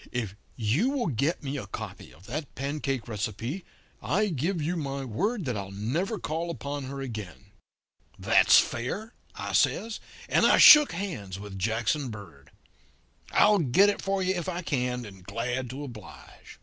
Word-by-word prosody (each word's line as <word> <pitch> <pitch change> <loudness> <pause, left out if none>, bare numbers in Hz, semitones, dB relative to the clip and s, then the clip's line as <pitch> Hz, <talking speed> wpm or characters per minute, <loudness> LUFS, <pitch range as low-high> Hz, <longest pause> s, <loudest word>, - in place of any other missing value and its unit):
If 110 -6 -3 0.2
you 125 - +1
will 275 -3 -1
get 150 +7 -1
me 140 +1 -3
a 100 - -8
copy - - -8
of 90 +5 -18
that 145 +5 -6
pancake 135 -3 -3
recipe, 115 - -4 0.4
I 210 +3 +1
give 165 +4 -1
you 160 +4 -1
my 140 -4 -3
word 190 - -1
that 125 -3 -2
I'll 100 -2 -5
never 135 - -2
call 165 +1 -3
upon 145 -4 -4
her 135 +1 -6
again.' 105 -5 -7 0.7
"'That's - - +5
fair,' 200 - -1 0.2
I - - -5
says, 225 0 +1 0.3
and - - +3
I - - +5
shook 300 -1 +9
hands 105 - -5
with 100 -1 -8
Jackson 115 +7 0
Bird. 95 -11 -11 0.8
'I'll 210 -1 +5
get 170 +7 +4
it 205 - -2
for 195 -1 -1
you 185 +1 +1
if 175 0 -3
I 180 0 -4
can, 125 -5 -1
and 95 -3 -12
glad 120 +6 -3
to 135 +4 -6
oblige.' 115 -8 -12
135 Hz, 165 wpm, -27 LUFS, 110-175 Hz, 0.8 s, shook